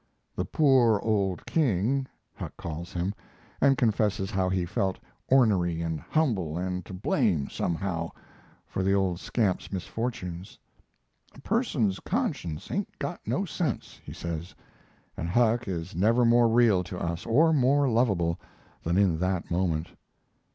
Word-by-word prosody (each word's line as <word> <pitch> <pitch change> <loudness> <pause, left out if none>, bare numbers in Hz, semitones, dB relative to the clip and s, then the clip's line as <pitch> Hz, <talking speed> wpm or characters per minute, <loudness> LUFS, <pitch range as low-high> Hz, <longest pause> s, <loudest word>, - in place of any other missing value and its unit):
The - - -1
"poor 130 -8 +4
old 100 -5 0
king" 130 - +1 0.3
Huck - - -8
calls 85 +1 -6
him, 90 +3 -2 0.5
and 135 -1 +5
confesses 105 -4 +1
how 95 -1 +1
he 90 -1 0
felt 95 +2 -1 0.3
"ornery 100 -10 +3
and 80 -2 -2
humble 100 - 0
and 90 0 -2
to - - -8
blame, 90 - +1
somehow," 85 -1 -2 0.6
for - - -3
the 95 +1 +2
old 95 -3 +1
scamp's 100 -5 -1
misfortunes. 95 -2 -4 0.8
"A 140 - -13
person's 140 - 0
conscience 80 0 -3
ain't 200 0 -3
got 175 - -4
no 195 - 0
sense," 165 -7 -3
he - - -9
says, 85 +1 -5 0.6
and 85 - -4
Huck 120 +3 +2
is 85 -2 -4
never 115 +7 +3
more 120 0 +5
real 115 -5 +4
to 90 0 -6
us, 85 -1 -3
or 160 +8 +4
more 140 0 +3
lovable, 100 -9 +1 0.4
than 85 +2 0
in 95 -5 +3
that 90 -1 -1
moment. 85 -2 0
95 Hz, 140 wpm, -27 LUFS, 85-120 Hz, 0.8 s, and